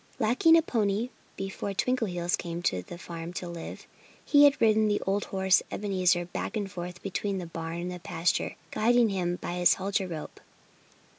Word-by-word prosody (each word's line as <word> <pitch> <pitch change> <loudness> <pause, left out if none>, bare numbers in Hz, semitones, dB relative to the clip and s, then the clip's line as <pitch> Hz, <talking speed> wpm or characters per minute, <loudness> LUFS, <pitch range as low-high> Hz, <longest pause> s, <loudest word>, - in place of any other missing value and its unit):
Lacking 325 - +5
a 325 - +3
pony, 220 -3 0 0.3
before 195 +1 -4
Twinkleheels 185 -8 0
came 170 0 -5
to 90 - +1
the 170 - -10
farm 170 -1 -7
to 180 - -5
live, 170 -1 -7 0.4
he 290 -1 +7
had 285 0 +4
ridden 220 -1 +4
the 205 -1 +1
old 200 +1 0
horse 190 -1 +3
Ebenezer 185 -3 +1
back 180 - -4
and 200 -2 -3
forth 180 0 -7
between 195 0 -2
the 180 - -4
barn 165 0 -5
and 180 +1 -4
the 180 - -6
pasture, 170 0 -1 0.2
guiding 235 +1 +3
him 180 -3 -1
by 180 0 -5
his 175 - +5
halter 195 0 -1
rope. 160 -3 -7
190 Hz, 175 wpm, -28 LUFS, 175-215 Hz, 0.4 s, he